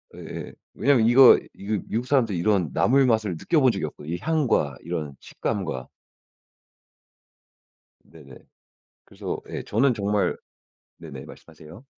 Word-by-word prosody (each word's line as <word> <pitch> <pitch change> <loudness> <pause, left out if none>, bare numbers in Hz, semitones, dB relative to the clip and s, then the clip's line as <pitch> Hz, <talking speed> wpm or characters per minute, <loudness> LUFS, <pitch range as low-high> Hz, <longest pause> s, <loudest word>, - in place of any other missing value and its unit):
예예. - - -8 0.2
왜냐하면 130 -4 +3
이거, 125 +1 +8 0.2
이거 105 0 -3
미국 115 +3 -2
사람도 125 -7 +2
이런 90 -4 0
나물 135 +2 +3
맛을 110 -5 +1
느껴본 135 - +2
적이 95 -6 -3
없거든요 75 +1 -7
이 - - -4
향과 140 - 0
이런 75 -4 -5
식감과. 85 - -4 2.2
네네. 70 -5 -16 0.7
그래서 - - -6
예 - - -5
저는 125 +4 +1
정말 105 -1 0 0.6
네네 - - -10
말씀하세요. 80 - -14
105 Hz, 275 characters per minute, -24 LUFS, 80-125 Hz, 2.2 s, 이거